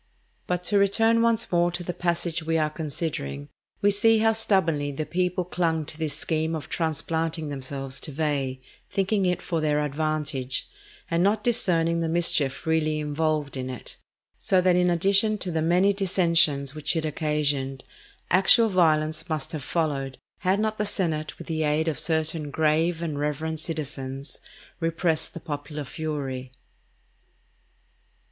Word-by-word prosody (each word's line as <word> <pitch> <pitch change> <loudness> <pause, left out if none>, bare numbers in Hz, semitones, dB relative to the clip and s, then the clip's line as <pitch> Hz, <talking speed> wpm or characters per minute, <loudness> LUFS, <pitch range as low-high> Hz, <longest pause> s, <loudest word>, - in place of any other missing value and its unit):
But 180 0 -1
to 200 +3 +3
return 225 +4 +3
once 230 -1 +2
more 175 0 +3
to 175 0 -4
the 175 - -4
passage 170 -1 -1
we 165 +1 0
are 155 -1 +1
considering, 140 - -4 0.3
we 205 - +5
see 225 +3 +4
how 225 +1 +4
stubbornly 175 -10 +1
the 150 +2 -4
people 180 +1 -1
clung 165 -3 -1
to 150 - -5
this 155 -3 -2
scheme 160 0 -1
of 155 - -7
transplanting 160 0 -1
themselves 135 -1 -4
to - - -5
Veii, 140 -3 -1 0.3
thinking 195 0 +1
it 180 - -1
for 165 -2 -2
their 150 -1 +1
advantage, 150 -3 -2 0.4
and 170 0 +2
not 205 +3 +2
discerning 170 -8 +2
the 165 -1 -1
mischief 160 -5 +2
really 155 -1 +1
involved 150 -1 -1
in 130 -1 -4
it; 125 - -8 0.4
so 190 - +2
that 180 -1 +3
in 180 0 +3
addition 200 +5 +3
to 185 -3 -4
the 160 -1 0
many 180 +5 +3
dissensions 170 -7 +3
which 155 +2 -1
it 160 -1 -1
occasioned, 145 -3 -1 0.5
actual 195 +5 +6
violence 160 -2 +2
must 155 -3 -3
have 155 - -4
followed, 140 -5 -2 0.2
had 190 +1 +1
not 215 0 -1
the - - +2
senate 165 -7 -2
with - - -9
the 160 -1 -2
aid 155 +1 +1
of 160 - 0
certain 160 -2 0
grave 160 +3 +1
and 155 -4 -3
reverend 155 +2 -2
citizens 140 -4 -5 0.4
repressed 165 0 0
the - - -5
popular 145 -1 -5
fury. 135 -4 -5
160 Hz, 155 wpm, -25 LUFS, 150-180 Hz, 0.5 s, actual